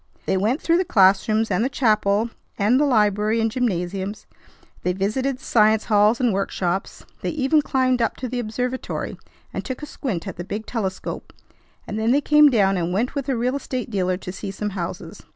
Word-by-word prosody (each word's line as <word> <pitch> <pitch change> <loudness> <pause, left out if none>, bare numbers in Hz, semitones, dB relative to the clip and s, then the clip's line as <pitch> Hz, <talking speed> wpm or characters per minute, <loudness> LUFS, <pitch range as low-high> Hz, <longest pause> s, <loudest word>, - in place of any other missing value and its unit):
They - - +1
went 215 +9 +1
through 335 +1 +3
the - - +2
classrooms 215 - +3
and - - +2
the 260 - +1
chapel 220 -3 +1 0.3
and 225 +5 +3
the 295 - +3
library 215 -3 +2
and 225 0 +1
gymnasiums. 195 -3 -2 0.6
They 180 - 0
visited 245 +8 -1
the - - -20
science 215 -1 +4
halls 210 +1 +3
and 245 -5 +2
workshops. 190 -1 -2 0.2
They - - -2
even 300 +1 +2
climbed 255 -3 +1
up 230 - +1
to 255 - -4
the 245 +1 -3
observatory, 245 +3 -3 0.4
and - - -3
took 260 +2 -6
a - - -2
squint 210 - -4
at 190 - -6
the 175 - -4
big 210 +4 -5
telescope, 195 -6 -4 0.5
and 210 - -4
then 220 +1 +1
they 270 +4 +4
came 300 +1 +6
down 195 -6 +3
and 175 0 -1
went 220 +7 0
with 280 -2 -3
a 260 - +1
real 250 +3 0
estate 255 -4 -4
dealer 185 -3 0
to 180 - -7
see 195 +2 -6
some 210 +2 -4
houses. 185 0 -6
220 Hz, 200 wpm, -22 LUFS, 195-255 Hz, 0.6 s, came